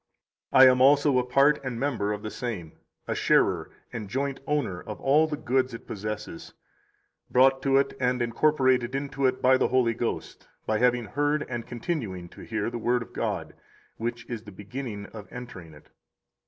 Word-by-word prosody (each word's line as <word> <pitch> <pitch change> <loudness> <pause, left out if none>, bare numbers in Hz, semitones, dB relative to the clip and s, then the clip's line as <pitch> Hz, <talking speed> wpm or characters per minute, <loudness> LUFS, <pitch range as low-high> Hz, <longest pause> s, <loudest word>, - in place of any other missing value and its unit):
52 - - +3
I - - +8
am 125 0 +1
also 140 0 +5
a - - +1
part 140 +4 +3
and 125 -3 -4
member 120 -7 -1
of 105 0 -4
the 110 - -5
same, 105 -11 -5 0.4
a - - 0
sharer - - +2 0.2
and 110 -4 -5
joint 135 +3 -2
owner 140 -12 -1
of - - -8
all 150 +4 +4
the 150 -1 -3
goods 130 -2 0
it - - -11
possesses, 105 +1 -6 0.7
brought 135 +1 +4
to 135 0 +3
it 140 - +1
and 125 -1 +1
incorporated 130 0 +2
into 135 -1 0
it 130 0 -2
by 130 +1 +6
the - - +2
Holy 125 -3 +2
Ghost 115 +1 -4 0.2
by 110 0 0
having 125 -1 +2
heard 145 +5 0
and 120 -2 -5
continuing 115 - -4
to - - -13
hear 110 0 -3
the 120 - -4
Word 120 +1 +1
of - - -18
God, - - -3 0.4
which 120 +1 -4
is 115 -3 -5
the 105 -2 -12
beginning 105 +1 -6
of 105 -2 -10
entering 95 -11 -9
it. 75 - -19
125 Hz, 185 wpm, -27 LUFS, 110-135 Hz, 0.7 s, I